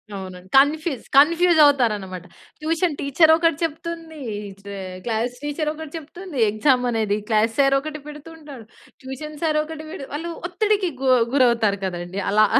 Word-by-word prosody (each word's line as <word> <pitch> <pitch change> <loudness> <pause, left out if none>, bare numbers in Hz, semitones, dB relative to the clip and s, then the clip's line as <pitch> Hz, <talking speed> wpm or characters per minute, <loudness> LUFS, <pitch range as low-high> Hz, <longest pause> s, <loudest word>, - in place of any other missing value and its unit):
అవునండి. 185 -1 -8
కన్‌ఫీస్ 290 -1 +2
confuse 335 +3 +5
అవుతారన్నమాట. 210 - +1 0.3
Tuition 320 0 0
teacher 315 +4 +4
ఒకటి 330 -2 +1
చెప్తుంది. 330 0 -5 0.2
ఈ 205 -1 -8
చ - - -32 0.4
క్లాస్ 235 +2 -1
టీచర్ 295 +1 -2
ఒకటి 315 -1 -9
చెప్తుంది. 325 +1 -9
ఎగ్జామ్ 250 +3 +2
అనేది 215 -3 0
క్లాస్ 220 +1 +2
సార్ 275 0 +4
ఒకటి 305 0 -7
పెడుతుంటాడు. 295 -5 -11 0.4
ట్యూషన్ 295 +3 -7
సార్ 305 -1 +2
ఒకటి 310 0 -8
పె 370 - -7 0.2
వాళ్ళు 335 +3 -4 0.2
ఒత్తిడికి 405 0 +1
గు 265 - +1 0.3
గురవుతారు 230 -6 +3
కదండీ. 175 +1 -4
అలా. 215 +1 +5
ఆ! - - +6
290 Hz, 150 wpm, -22 LUFS, 225-320 Hz, 0.4 s, ఆ